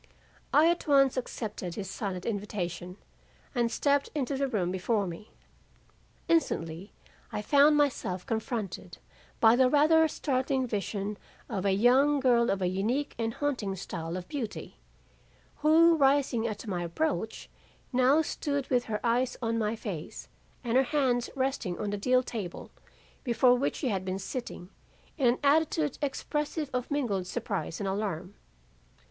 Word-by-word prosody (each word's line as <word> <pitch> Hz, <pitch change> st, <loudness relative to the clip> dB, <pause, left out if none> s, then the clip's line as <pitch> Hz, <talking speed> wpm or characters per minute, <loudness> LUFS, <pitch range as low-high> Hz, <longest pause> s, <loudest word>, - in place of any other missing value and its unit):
I 310 Hz, +2 st, +6 dB
at 345 Hz, -1 st, 0 dB
once 275 Hz, -2 st, +5 dB
accepted 215 Hz, -8 st, -4 dB
his 195 Hz, -2 st, -5 dB
silent 190 Hz, -2 st, -4 dB
invitation 185 Hz, -4 st, -4 dB, 0.6 s
and 240 Hz, -3 st, +1 dB
stepped 280 Hz, +3 st, +1 dB
into 280 Hz, -1 st, -1 dB
the 275 Hz, +1 st, 0 dB
room 195 Hz, -8 st, -1 dB
before 200 Hz, +3 st, 0 dB
me. 180 Hz, +5 st, -8 dB, 1.0 s
Instantly 180 Hz, -, 0 dB, 0.4 s
I 210 Hz, -, -3 dB
found 290 Hz, +4 st, +5 dB
myself 220 Hz, -11 st, 0 dB
confronted 215 Hz, -6 st, -4 dB, 0.4 s
by 225 Hz, 0 st, +6 dB
the 255 Hz, 0 st, +4 dB
rather 315 Hz, +3 st, +5 dB
startling 265 Hz, -3 st, -1 dB
vision 205 Hz, -2 st, -3 dB, 0.3 s
of 195 Hz, -1 st, -3 dB
a 195 Hz, -, +3 dB
young 260 Hz, +8 st, +4 dB
girl 245 Hz, -3 st, +3 dB
of 195 Hz, -1 st, 0 dB
a -, -, +2 dB
unique 220 Hz, +10 st, -1 dB
and 225 Hz, 0 st, -1 dB
haunting 245 Hz, -10 st, -2 dB
style 170 Hz, -2 st, -5 dB
of 180 Hz, -, -7 dB
beauty, 255 Hz, -8 st, -6 dB, 0.8 s
who 325 Hz, +3 st, +5 dB
rising 270 Hz, -5 st, +2 dB
at 215 Hz, -1 st, -5 dB
my 185 Hz, -5 st, -2 dB
approach 220 Hz, -, -2 dB, 0.5 s
now 260 Hz, +5 st, +4 dB
stood 285 Hz, -2 st, -2 dB
with 245 Hz, -1 st, +2 dB
her 210 Hz, -1 st, -2 dB
eyes 245 Hz, +2 st, +1 dB
on 230 Hz, -1 st, -1 dB
my 215 Hz, 0 st, 0 dB
face 190 Hz, -8 st, -7 dB, 0.3 s
and 240 Hz, 0 st, +1 dB
her -, -, +6 dB
hands 255 Hz, -3 st, +1 dB
resting 260 Hz, -9 st, -1 dB
on 205 Hz, -1 st, -3 dB
the 205 Hz, -, -2 dB
deal 255 Hz, +4 st, +3 dB
table 210 Hz, -8 st, -6 dB, 0.5 s
before 245 Hz, 0 st, +4 dB
which 250 Hz, +3 st, 0 dB
she 265 Hz, -, -2 dB
had 190 Hz, -4 st, -1 dB
been 185 Hz, 0 st, -3 dB
sitting, 195 Hz, -3 st, -6 dB, 0.5 s
in 265 Hz, -, +4 dB
an 240 Hz, +1 st, +2 dB
attitude 305 Hz, 0 st, +2 dB
expressive 295 Hz, +1 st, -2 dB
of 250 Hz, 0 st, -2 dB
mingled 220 Hz, -11 st, -1 dB
surprise 205 Hz, -4 st, -3 dB
and 200 Hz, -, -2 dB
alarm. 190 Hz, -2 st, -3 dB
235 Hz, 150 wpm, -29 LUFS, 195-275 Hz, 1.0 s, I